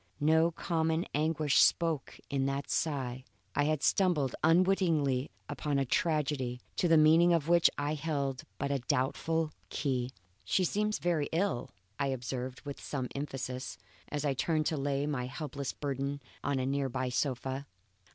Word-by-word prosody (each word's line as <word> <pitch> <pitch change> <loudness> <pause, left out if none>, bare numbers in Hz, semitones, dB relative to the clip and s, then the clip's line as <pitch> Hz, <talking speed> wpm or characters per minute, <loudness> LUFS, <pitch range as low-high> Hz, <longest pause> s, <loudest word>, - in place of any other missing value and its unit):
No 160 +2 +4
common 160 0 0
anguish 155 -1 +2
spoke 165 -5 +2
in 135 -1 0
that 140 +1 -2
sigh. 130 -5 -1 0.3
I 145 - +2
had 155 -1 0
stumbled 170 -9 +2
unwittingly 165 -6 +3 0.2
upon 145 0 -1
a 135 - +2
tragedy, 140 -4 0 0.2
to 175 - +2
the 165 -1 +6
meaning 165 +3 +6
of 165 -3 +1
which 170 0 +6
I 145 +1 0
held 140 -3 -2 0.2
but 140 0 -2
a 140 - +1
doubtful 150 +6 0 0.2
key. 130 -4 -1 0.3
"She 185 - +2
seems 210 +4 +1
very 170 -4 0
ill," 170 -7 0 0.3
I 140 - +1
observed 125 0 -4
with 140 -1 -7
some 130 -4 -3
emphasis, 135 -2 -4 0.3
as 150 0 -2
I 140 - +2
turned 155 +3 0
to 160 - +1
lay 140 0 0
my 135 -4 -2
helpless 140 +1 -4
burden 140 0 -3 0.2
on 140 -1 0
a 130 - 0
near 135 0 0
by 130 0 -2
sofa. 135 +1 -2
145 Hz, 155 wpm, -31 LUFS, 135-160 Hz, 0.3 s, the